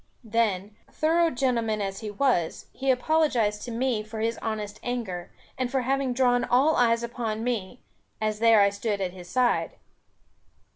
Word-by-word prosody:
Then, 210 -3 0 0.2
thorough 330 +2 +2
gentleman 240 -5 0
as 195 -1 -3
he 220 - -5
was, 205 -6 0
he 270 0 -2
apologized 250 -6 +2
to 240 - -6
me 235 -1 0
for 220 +1 -8
his 225 +1 -1
honest 215 -2 -4
anger, 220 -8 -4 0.3
and 255 -1 0
for 265 0 0
having 270 +1 0
drawn 245 -1 +2
all 275 +6 +3
eyes 230 -1 +3
upon 230 -2 -3
me, 235 -2 -3 0.4
as 215 -1 -1
there 225 -2 +6
I 200 0 +4
stood 200 0 -2
at 185 -2 -2
his 180 -2 -11
side. 250 +1 +1
230 Hz, 160 wpm, -26 LUFS, 210-250 Hz, 0.4 s, there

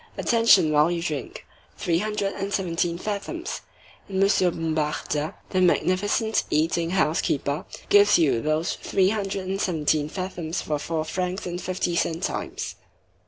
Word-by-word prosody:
Attention 225 -9 +4
while 150 +2 +4
you 175 -1 -1
drink! 155 -5 -4 0.3
three 170 -1 +1
hundred 210 -1 -1
and 195 +1 -4
seventeen 170 -3 0
fathoms! 215 - -4 0.5
and 190 -1 -2
Monsieur 195 -2 +4
Bombarda, 155 0 -2 0.2
the 185 - +2
magnificent 205 +5 +2
eating 165 +2 +1
house 170 -3 +2
keeper, 140 +1 -1 0.2
gives 205 0 +6
you 145 -8 +2
those 155 +2 0
three 190 -1 +1
hundred 195 -3 -2
and 195 +1 -2
seventeen 155 -3 +1
fathoms 180 -2 -4
for 150 -1 -2
four 160 +1 -2
francs 180 +3 -3
and 175 0 -4
fifty 180 -2 -2
centimes." 165 -1 -2
175 Hz, 140 wpm, -25 LUFS, 155-195 Hz, 0.5 s, gives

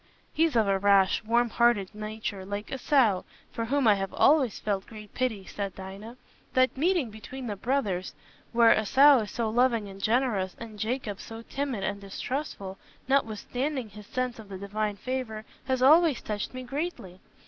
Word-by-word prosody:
'" - - -36
"He's 320 -3 +2
of 220 -3 +3
a 195 -1 +2
rash, 200 +1 +4
warm 235 +1 +2
hearted 230 -5 +2
nature, 215 -2 -5
like 205 +2 -5
Esau, 255 -7 +3 0.3
for 230 -2 -3
whom 270 +1 +1
I 215 - +7
have 195 -1 -3
always 275 -8 +4
felt 200 -2 -2
great 215 -3 -11
pity," 225 -7 -2
said 200 -1 -5
Dinah. 195 +5 -9 0.4
"That 255 0 +3
meeting 315 - +1
between 250 +5 -8
the 210 -3 -3
brothers, 205 -6 -1 0.4
where 235 -1 +6
Esau 270 +6 +6
is 210 -2 -3
so 230 -2 -2
loving 235 -3 +2
and 195 0 -10
generous, 215 -5 +1
and 220 -2 -9
Jacob 220 -2 -2
so 225 0 -9
timid 270 -5 -3
and 200 0 -2
distrustful, 200 -1 -5 0.3
notwithstanding 260 +1 -1
his 210 0 -12
sense 255 -2 -2
of 215 -2 -11
the 190 - -6
Divine 205 +2 -2
favour, 220 -1 -4 0.2
has 260 -1 0
always 310 0 +6
touched 210 -1 -3
me 255 - -5
greatly. 255 - -5
225 Hz, 170 wpm, -28 LUFS, 200-255 Hz, 0.4 s, I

